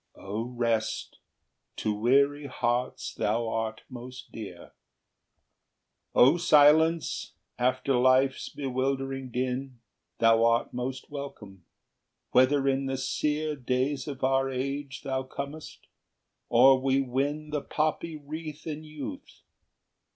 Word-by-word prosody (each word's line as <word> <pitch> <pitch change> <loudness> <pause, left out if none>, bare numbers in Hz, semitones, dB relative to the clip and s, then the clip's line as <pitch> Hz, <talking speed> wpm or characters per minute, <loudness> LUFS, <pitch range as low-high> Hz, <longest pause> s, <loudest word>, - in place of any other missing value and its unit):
XXXVIII. - - -15
"O 105 +3 -3 0.2
Rest, 115 -2 -1 0.6
to 110 - -1
weary 140 +6 +2
hearts 125 -1 -2
thou 115 0 0
art 110 0 -3
most 125 0 -10
dear! 95 -6 -9 1.4
O 135 +7 +6
Silence, 160 0 +4 0.3
after 130 +2 +1
life's 130 +1 +3
bewildering 135 0 -2
din, 125 +1 -3 0.4
Thou 115 0 +4
art 115 0 +2
most 130 +3 -5
welcome, 105 - -8 0.7
whether 135 +2 +4
in 135 0 +1
the 135 0 -2
sear 150 +3 -1
Days 130 +2 -1
of 140 -3 -6
our 135 0 +2
age 135 +1 -4
thou 135 -2 -1
comest, 140 +3 -8 0.6
or 130 +2 +6
we 135 0 +2
win 140 +4 -2
Thy 150 - 0
poppy 155 +2 -2
wreath 155 +1 -8
in 155 -1 -5
youth! 155 - -8
135 Hz, 115 wpm, -28 LUFS, 125-145 Hz, 1.4 s, O